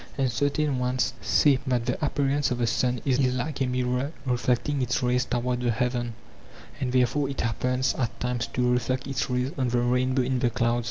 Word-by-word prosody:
And 135 -3 +1
certain 145 +2 0
ones 125 0 0
say 135 +6 +4
that 125 -2 +1
the 130 - -2
appearance 140 0 +1
of 125 - -1
the 120 - +1
sun 125 +2 0
is 135 -2 +2
like 130 +2 0
a 130 - +2
mirror 125 +2 -1
reflecting 125 +3 0
its 125 0 0
rays 125 0 +2
toward 125 0 -1
the 120 - +1
heaven, 120 0 -1 0.6
and 130 -3 -1
therefore 130 +3 +2
it 140 - -3
happens 125 +3 0
at 120 -3 -3
times 125 -1 -1
to 125 - -2
refiect 125 +1 +1
its 135 0 -2
rays 125 +1 0
on 130 - +1
the 120 0 +1
rainbow 125 +2 +1
in 130 0 0
the 120 - +2
clouds. 120 +1 +1
125 Hz, 200 wpm, -26 LUFS, 125-130 Hz, 0.6 s, say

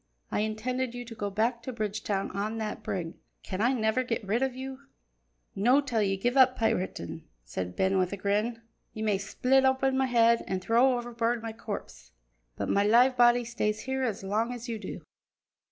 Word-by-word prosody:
I - - 0
intended 235 +4 -2
you 245 0 -6
to 230 - -9
go 205 -2 -3
back 230 +4 0
to 255 - -5
Bridgetown 210 -3 -2
on 210 +3 -3
that 215 -1 -4
brig. 170 -3 -3 0.3
Can 190 +1 -4
I 240 +3 +4
never 220 -1 +1
get 235 -4 -3
rid 220 +5 0
of 265 -1 0
you?" 265 0 -6 0.7
"No' 245 +8 +4
till 250 -6 0
ye 195 -1 +1
give 245 +6 0
up 260 -1 +5
piratin'," 220 - -2 0.2
said 90 +9 -5
Ben 190 0 +2
with 180 -1 +1
a 200 - -4
grin. 210 +4 -1 0.3
"Ye 220 - -4
may 210 -3 +1
split 255 +6 +2
open 265 0 +2
my 265 0 +2
head, 235 -1 +4
an' 190 - -1
throw 240 +6 +3
overboard 235 -1 -1
my 225 -1 -4
corpse, 220 -2 -8 0.4
but - - -3
my 200 - +3
live 245 +5 +5
body 240 0 +5
stays 215 -2 -1
here 265 0 -2
as 225 -7 -2
long 215 +5 0
as 245 0 -6
ye 230 -2 -3
do." - - -7
230 Hz, 195 wpm, -29 LUFS, 205-245 Hz, 0.7 s, up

